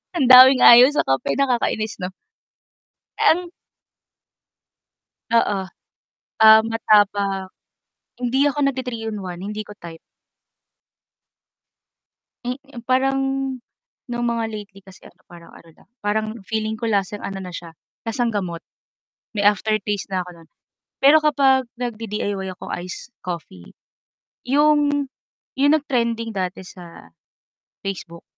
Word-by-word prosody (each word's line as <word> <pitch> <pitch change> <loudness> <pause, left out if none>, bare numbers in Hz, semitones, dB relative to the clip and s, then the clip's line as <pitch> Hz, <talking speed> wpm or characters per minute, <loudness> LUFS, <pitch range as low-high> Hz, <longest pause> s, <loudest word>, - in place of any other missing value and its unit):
Ang 275 -7 +1
daming 255 +1 +9
ayaw 240 +2 +9
sa - - +2
kape 135 0 0
nakakainis 230 -4 0
'no? 180 0 -4 1.1
Ang 350 +1 +2 1.8
Oo. 220 -4 +2 0.8
Ah, 220 0 +9
matapang. 205 -4 +1 0.7
Hindi 255 +3 +1
ako 290 - -4
nag-ti-3 250 -4 -3
in 210 - -5
1, 180 0 -7
hindi 210 +1 -5
ko 210 - -11
type. 165 -3 -11 2.5
Eh, 250 +2 -3 0.3
parang, 270 +1 +2 0.9
nung 240 0 -2
mga 230 -1 -1
lately 205 -2 -9
kasi 190 0 -17
ano - - -18
parang 170 -1 -15
ano 165 - -16
lang, - - -25
parang 215 +1 -1 0.2
feeling 220 +2 -3
ko 225 +1 -3
lasang 205 0 -1
ano 195 -1 -6
na 185 -2 -8
siya, 165 -2 -9 0.2
lasang 230 0 -2
gamot. 175 -5 -4 0.7
May 205 0 0
aftertaste 205 0 0
na 185 -1 -1
ako 175 -2 -13
no'n. 160 - -26 0.5
Pero 285 +3 +7
kapag 265 -3 +3
nag-di-DIY 210 -5 -4
ako 180 - -11
ice 180 +8 -8 0.2
coffee. 160 - -8 0.7
'Yong, 290 0 +2 0.5
'yong 285 +2 +4
nag-trending 235 -5 -2
dati 185 0 -4
sa 170 - -13 0.7
Facebook. 170 -3 -7
215 Hz, 115 wpm, -21 LUFS, 190-250 Hz, 2.5 s, daming